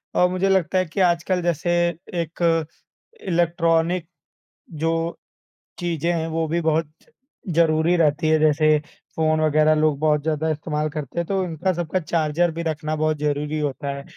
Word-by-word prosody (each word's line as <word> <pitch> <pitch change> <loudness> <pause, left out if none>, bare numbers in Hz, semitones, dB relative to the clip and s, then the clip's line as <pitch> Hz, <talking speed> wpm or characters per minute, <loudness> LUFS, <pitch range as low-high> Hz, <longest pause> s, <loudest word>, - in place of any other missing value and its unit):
और 180 0 +4
मुझे 185 +2 0
लगता 190 -1 +2
है 185 - +2
कि 170 +4 -6
आजकल 175 +1 0
जैसे 175 0 0 0.4
एक 165 0 0 0.6
इलेक्ट्रॉनिक 170 0 +1 0.8
जो 165 - +2 0.9
चीज़ें 170 -1 -1
हैं 165 -1 -1
वो 160 0 -1
भी 170 +2 -1
बहुत-ज़रूरी 165 - -1
रहती 155 -1 +2
है 155 0 +4
जैसे 155 0 +4 0.4
फ़ोन 155 0 +1
वगैरह 155 0 +4
लोग 155 -2 +2
बहुत 150 -1 +2
ज़्यादा 160 0 -1
इस्तेमाल 155 0 -2
करते 150 +1 -5
हैं 170 - -1
तो 195 -1 0
इनका 175 +3 -1
सबका 175 +2 -2
चार्जर 165 +1 0
भी 165 +1 -5
रखना 155 -1 -2
बहुत 155 0 0
ज़रूरी 150 +1 -1
होता 145 -1 -3
है। 140 - -8
160 Hz, 150 wpm, -22 LUFS, 155-170 Hz, 0.9 s, और